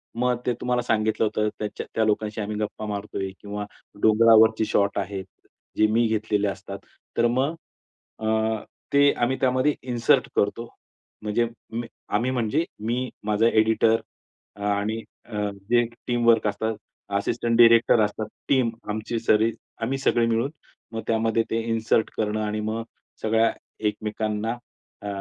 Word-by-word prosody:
मग 125 0 +1
ते 125 - +2
तुम्हाला 125 0 +1
सांगितलं 110 -1 +1
होतं, 105 0 0
त्याच्या 105 -1 -4
त्या 110 - +3
लोकांशी 105 0 0
आम्ही 105 +1 -3
गप्पा 105 0 -3
मारतोय 100 -2 -4
किंवा 105 0 -5 0.4
डोंगरावरची 110 0 +6
शॉट 100 -1 +1
आहे. 100 0 -3 0.6
जे 110 - +5
मी 115 +2 +3
घेतलेले 105 -2 0
असतात. 100 0 -5 0.4
तर 120 - +4
मग 130 +7 0 0.6
अ, 110 - -5 0.7
ते 140 0 +6
आम्ही 125 +2 +1
त्यामध्ये 130 +3 +3
इन्सर्ट 120 -2 +2
करतो. 115 +3 0 0.5
म्हणजे 110 +2 +1 0.2
मी 115 +1 -3 0.3
आम्ही 120 +5 +2
म्हणजे 120 +5 +1 0.2
मी, 125 +3 -1
माझा 105 +2 +2
एडिटर 110 0 +3 0.7
आणि 105 +3 -1 0.2
अ, 105 -2 -2 0.2
जे 120 0 +5 0.2
टीमवर्क 115 -3 +3
असतात, 110 +2 -1 0.4
असिस्टंट 115 +3 0
डायरेक्टर 115 -1 +6
असतात. 105 +1 -1 0.2
टीम 130 -4 +3 0.2
आमची 110 +2 -2
सरी 110 0 +3 0.3
आम्ही 130 +4 0
सगळे 120 -3 +2
मिळून 115 +5 +1 0.4
मग 115 - -3
त्यामध्ये 115 0 +2
ते 115 - +1
इन्सर्ट 115 0 +1
करणं 110 0 0
आणि 105 0 -2
मग 110 +2 -2 0.4
सगळ्या 110 +1 +3 0.4
एकमेकांना 110 +2 -2 0.5
अ, - - -3
110 Hz, 140 wpm, -25 LUFS, 105-120 Hz, 0.7 s, डोंगरावरची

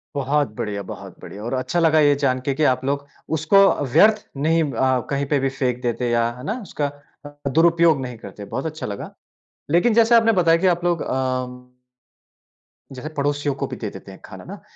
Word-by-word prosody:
बहुत 140 -2 0
बढ़िया, 100 -1 -4
बहुत - - -10
बढ़िया। 105 +2 -9
और 120 +3 -4
अच्छा 130 +7 -1
लगा 160 -1 +4
ये 145 -1 +4
जान 130 -1 +2
के 140 - +1
कि 155 +3 -1
आप 130 -2 +2
लोग 140 +1 -2 0.3
उसको 160 +6 +2 0.4
व्यर्थ 215 0 +5
नहीं 160 +3 +2
अ, 130 +1 +1
कहीं 140 0 -1
पे 140 0 +1
भी 135 0 0
फेंक 125 -2 -2
देते 120 0 -1
या 115 0 +2
है 125 - -10
ना? 220 +8 -3
उसका 150 -7 -4 0.4
अ - - -6 0.2
अ, - - +1
दुरुपयोग 165 -1 +3
नहीं 125 -2 -6
करते। 100 0 -10
बहुत 130 +8 -5
अच्छा 155 0 -5
लगा। 100 -1 -6 0.6
लेकिन 195 +7 +3
जैसे 230 +1 +5
आपने 225 0 +5
बताया 165 0 +4
कि 190 - +3
आप 175 -1 +1
लोग 175 -2 0
अ, 130 -1 -1
उम 125 0 -10 1.3
जैसे 135 +4 -7
पड़ोसियों 145 0 0
को - - -3
भी - - -6
दे - - -4
देते - - -11
हैं - - -13
खाना - - -11
ना - - -9
140 Hz, 210 wpm, -21 LUFS, 130-165 Hz, 1.3 s, व्यर्थ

